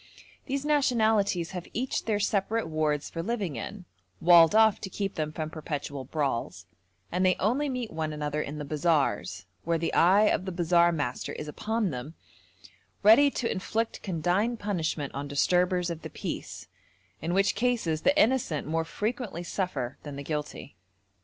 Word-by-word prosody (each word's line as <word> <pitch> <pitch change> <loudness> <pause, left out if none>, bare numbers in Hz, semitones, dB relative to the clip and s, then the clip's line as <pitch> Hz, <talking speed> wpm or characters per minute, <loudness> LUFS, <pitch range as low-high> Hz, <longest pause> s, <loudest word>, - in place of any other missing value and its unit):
These 275 +1 -2
nationalities 220 - +2
have 180 -2 -6
each 255 +3 -2
their 215 -2 +1
separate 210 +1 0
wards 155 -2 0
for 165 - -5
living 200 - -2
in, 180 - -6 0.3
walled 170 +2 +7
off 220 -2 +5
to 195 - -5
keep 195 0 -3
them 155 -1 -2
from 155 0 -5
perpetual 145 -3 -5
brawls, 140 -4 -2 0.5
and 180 +2 0
they 185 -1 +4
only 260 +8 +1
meet 250 -4 -3
one 160 -1 -3
another 150 0 -2
in 150 +1 -5
the 150 - -5
bazaars, 155 0 0 0.2
where 170 0 +1
the 165 - -2
eye 190 +5 +5
of 210 -3 +2
the 190 - -3
bazaar 175 0 +3
master 145 -7 -3
is 150 - -6
upon 215 +5 -1
them, 130 +5 -6 0.9
ready 230 +8 +7
to 245 -4 -2
inflict 225 +4 -2
condign 190 +6 0
punishment 165 -8 -2
on 140 +1 -4
disturbers 180 +5 +1
of 165 -1 -6
the - - -7
peace, - - -6 0.5
in 170 +3 -1
which 195 0 +3
cases 220 -9 0
the 290 +2 +3
innocent 225 - +2
more 165 +1 0
frequently 215 -2 -3
suffer 175 -9 -3
than 145 -2 -8
the 140 - -6
guilty. 150 -1 -5
175 Hz, 165 wpm, -28 LUFS, 155-215 Hz, 0.9 s, walled